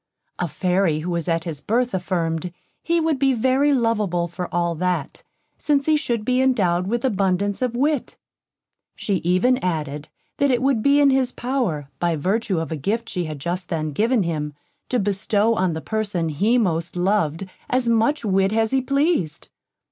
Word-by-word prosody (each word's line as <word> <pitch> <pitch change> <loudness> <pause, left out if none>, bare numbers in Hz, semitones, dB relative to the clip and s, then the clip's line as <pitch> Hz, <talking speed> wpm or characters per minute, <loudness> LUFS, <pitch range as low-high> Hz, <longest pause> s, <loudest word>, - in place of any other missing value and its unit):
A 175 - 0
Fairy, 180 0 0
who 175 +3 -3
was 170 -2 -2
at 165 -1 0
his 155 -4 -5
birth, 245 +3 0
affirmed, 175 -2 -2 0.3
he 340 0 +1
would 320 -4 0
be 270 -1 +3
very 260 +5 +2
lovable 210 -9 +1
for 175 +1 -6
all 170 -1 0
that, 175 -3 -2 0.4
since 285 -2 +1
he 310 - +3
should 235 -7 -1
be 255 +1 +2
indowed 185 -9 +2
with 235 +4 -1
abundance 200 -2 0
of 250 -2 -1
wit. 285 +2 0 0.8
She 200 -3 -1
even 185 +10 +2
added, 150 -4 -3 0.3
that 280 - +2
it 250 -1 +1
would 265 -5 +2
be 280 +4 +4
in 285 -1 +5
his 260 -2 +2
power, 240 - -2
by 170 -1 +1
virtue 190 +3 0
of 165 0 -4
a 160 - -2
gift 220 - -2
she 180 -1 -2
had 155 -1 -5
just 175 +5 -4
then 155 -2 -2
given 220 - +2
him, 150 -3 -3 0.3
to 250 - +1
bestow 205 +1 +1
on 185 -5 0
the 160 - -4
person 200 -6 -2
he 205 +11 +2
most 170 -8 -1
loved 180 -2 0 0.2
as 255 -1 +1
much 230 +4 +2
wit 195 -1 +2
as 225 0 +1
he 265 0 +2
pleased. 275 - 0
195 Hz, 180 wpm, -22 LUFS, 170-250 Hz, 0.8 s, in